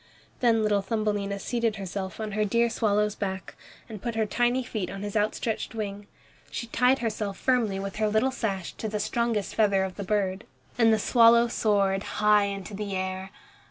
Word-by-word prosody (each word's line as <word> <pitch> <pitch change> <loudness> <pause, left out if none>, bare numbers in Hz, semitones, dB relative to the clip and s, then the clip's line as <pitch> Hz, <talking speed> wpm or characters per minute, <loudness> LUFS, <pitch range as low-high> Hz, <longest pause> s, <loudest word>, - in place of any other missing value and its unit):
Then 230 -3 +3
little 205 -1 +2
Thumbelina 205 -1 -1
seated 230 +1 -1
herself 190 0 -5
on 215 -1 -3
her 215 +1 0
dear 235 +3 +2
swallow's 210 -2 +1
back, 190 -3 -5 0.3
and 215 -5 -8
put 235 0 -3
her 220 -1 +1
tiny 245 +4 +1
feet 210 -6 -4
on 195 +1 -6
his 205 0 -5
outstretched 215 +2 -1
wing. 205 -2 -5 0.4
She - - -4
tied 250 +3 +3
herself 210 -3 -2
firmly 235 -7 +1
with 195 +1 -5
her 215 0 +2
little 220 +5 +2
sash 195 -8 -3
to 220 - -3
the 210 0 -2
strongest 220 -1 -1
feather 200 -3 +3
of 190 -1 -5
the 200 - -4
bird. 195 -1 -1 0.3
And 230 -2 +4
the 220 - +4
swallow 235 +1 +5
soared 200 -4 +1 0.2
high 210 -1 +5
into 200 +1 -5
the 200 -1 -4
air. 190 0 -3
210 Hz, 185 wpm, -27 LUFS, 195-225 Hz, 0.4 s, swallow